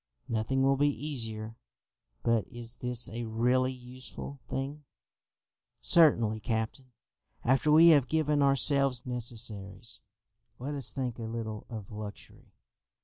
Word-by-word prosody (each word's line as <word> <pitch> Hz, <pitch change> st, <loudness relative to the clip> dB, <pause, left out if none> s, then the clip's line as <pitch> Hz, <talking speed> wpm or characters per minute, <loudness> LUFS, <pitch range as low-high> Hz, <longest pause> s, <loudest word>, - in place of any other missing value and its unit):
"Nothing 115 Hz, +4 st, 0 dB
will 135 Hz, 0 st, +3 dB
be 145 Hz, +1 st, +3 dB
easier; 115 Hz, -7 st, -4 dB, 0.7 s
but 115 Hz, -2 st, +1 dB
is 120 Hz, 0 st, -7 dB
this 125 Hz, -1 st, +4 dB
a 115 Hz, +1 st, -5 dB
really 125 Hz, +3 st, +1 dB
useful 130 Hz, +2 st, -10 dB
thing?" 140 Hz, +3 st, -4 dB, 1.0 s
"Certainly, 115 Hz, -10 st, +4 dB
captain. 110 Hz, +4 st, -3 dB, 0.5 s
After 135 Hz, +4 st, +3 dB
we 165 Hz, +2 st, +8 dB
have 145 Hz, -6 st, +5 dB
given 150 Hz, -1 st, +1 dB
ourselves 140 Hz, -2 st, +3 dB
necessaries, 110 Hz, -5 st, -6 dB, 0.6 s
let 140 Hz, +4 st, -5 dB
us 140 Hz, -4 st, -4 dB
think 125 Hz, -3 st, -4 dB
a 115 Hz, -, -4 dB
little 110 Hz, -1 st, -5 dB
of 110 Hz, -4 st, -8 dB
luxury. 105 Hz, -1 st, -9 dB
125 Hz, 120 wpm, -30 LUFS, 110-135 Hz, 1.0 s, we